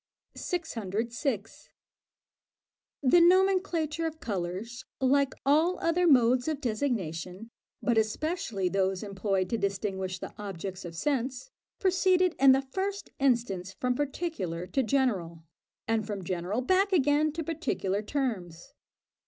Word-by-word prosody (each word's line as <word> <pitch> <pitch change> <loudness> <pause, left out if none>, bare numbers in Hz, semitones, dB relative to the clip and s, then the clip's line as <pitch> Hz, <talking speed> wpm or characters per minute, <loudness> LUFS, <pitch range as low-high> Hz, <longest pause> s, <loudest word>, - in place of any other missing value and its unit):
606. 230 - -3 1.3
The 275 +7 +6
nomenclature 345 -3 +3
of 320 0 -7
colours, 200 - -4 0.2
like 275 +1 +2
all 315 +6 +3
other 345 +2 +2
modes 250 -3 +4
of 310 -3 -1
designation, 215 - -3 0.3
but 235 -2 +3
especially 220 - -1
those 190 +1 0
employed 195 -2 -1
to 230 - 0
distinguish 190 -2 -2
the - - -8
objects 195 -2 -6
of 170 -1 -7
sense, 265 - -2 0.3
proceeded 370 -1 +3
in 270 0 +8
the 270 +1 +3
first 390 +9 -4
instance 230 -8 +1
from 250 0 +1
particular 255 - -3
to 270 +9 0
general, 205 -11 0 0.4
and 220 -2 0
from 200 -3 -4
general 185 +6 -2
back 375 +8 +2
again 300 -2 +3
to 325 +1 -3
particular 280 - -2
terms. 215 - -3
245 Hz, 120 wpm, -29 LUFS, 195-310 Hz, 1.3 s, in